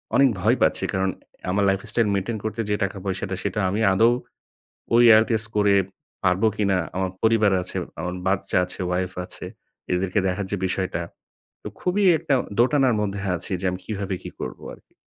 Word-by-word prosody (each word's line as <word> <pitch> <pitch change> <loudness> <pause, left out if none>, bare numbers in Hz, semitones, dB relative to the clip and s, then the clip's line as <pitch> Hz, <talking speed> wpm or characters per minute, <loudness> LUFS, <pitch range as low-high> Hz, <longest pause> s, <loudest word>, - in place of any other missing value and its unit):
অনেক 135 -1 +6
ভয় - - +3
পাচ্ছি। - - +2
কারণ 95 0 +1 0.4
আমার 100 +1 +1
লাইফ-স্টাইল 105 +3 0
মেইনটেইন 100 +3 -1
করতে 115 +1 -2
যে 105 - +2
টাকা-পয়সাটা, 95 0 -3
সেটা 105 - -2
আমি 105 +4 -1
আদৌ 115 +5 +5 0.8
ওই 120 - +7
IELTS 110 -1 +3
করে 100 -1 +4 0.5
পারবো 90 +4 +3
কিনা। 100 -3 +2 0.2
আমার 95 -1 0
পরিবার 110 -3 +4
আছে, - - -6 0.2
আমার 90 +1 -3
বাচ্চা 95 -1 0
আছে, 90 - -9
ওয়াইফ 90 +1 -1
আছে। - - -8 0.5
এদেরকে 90 +3 0
দেখার 95 +1 -1
যে 100 - -1
বিষয়টা, 90 -2 -2 0.6
তো - - -5
খুবই 195 +3 +1
একটা 140 - 0 0.3
দোটানার 130 -1 +3
মধ্যে 100 -1 -2 0.2
আছি 90 +3 -5
যে - - -6
আমি 90 - -5
কীভাবে 100 -3 -3
কী - - -7
করব - - -6
আর - - -19
কি। - - -37
100 Hz, 170 wpm, -23 LUFS, 95-110 Hz, 0.8 s, ওই